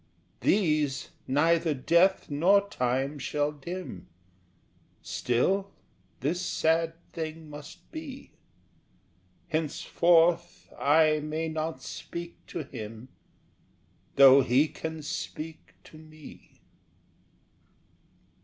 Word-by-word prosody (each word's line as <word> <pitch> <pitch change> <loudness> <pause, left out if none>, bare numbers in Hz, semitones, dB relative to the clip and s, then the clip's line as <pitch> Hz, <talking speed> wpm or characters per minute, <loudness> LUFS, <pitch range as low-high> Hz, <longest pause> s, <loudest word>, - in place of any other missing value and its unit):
These 150 -8 +1 0.2
neither 160 +3 +2
death 170 +8 +3
nor 190 +8 +3
time 135 +1 -1
shall 145 +2 -1
dim, 150 - -7 1.0
Still 190 +12 0 0.5
this 160 +7 -1
sad 165 +1 +1 0.2
thing 160 -2 -6
must 145 +2 -11
be 295 -5 -8 1.2
Henceforth 165 +2 +2
I 155 +1 +4
may 155 +2 -3
not 160 +1 -4
speak 170 0 -8
to 165 - -5
him, 115 -2 -9 1.1
Though 135 0 +8
he 130 +4 +3
can 160 -1 -6
speak 155 +1 -6
to 155 - -14
me! 155 -1 -15
155 Hz, 85 wpm, -28 LUFS, 145-170 Hz, 1.2 s, Though